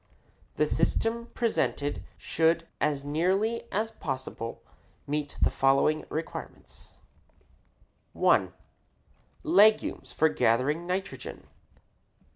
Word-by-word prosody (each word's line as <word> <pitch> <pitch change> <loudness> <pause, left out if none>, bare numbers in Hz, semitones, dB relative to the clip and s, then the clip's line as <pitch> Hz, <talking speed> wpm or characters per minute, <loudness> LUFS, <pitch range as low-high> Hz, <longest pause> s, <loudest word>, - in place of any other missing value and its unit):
The - - +2
system 235 +1 0
presented 180 - 0 0.2
should 165 +1 +1
as 140 -2 0
nearly 190 +10 0
as 220 +3 -1
possible 130 - -5 0.4
meet 145 0 -3
the - - +4
following 135 +3 +2
requirements: 160 +1 -7 1.2
1. - - +3 0.9
Legumes 220 -10 +4
for 160 - +3
gathering 150 +4 +1
nitrogen. 190 +2 -4
160 Hz, 85 wpm, -28 LUFS, 145-215 Hz, 1.2 s, the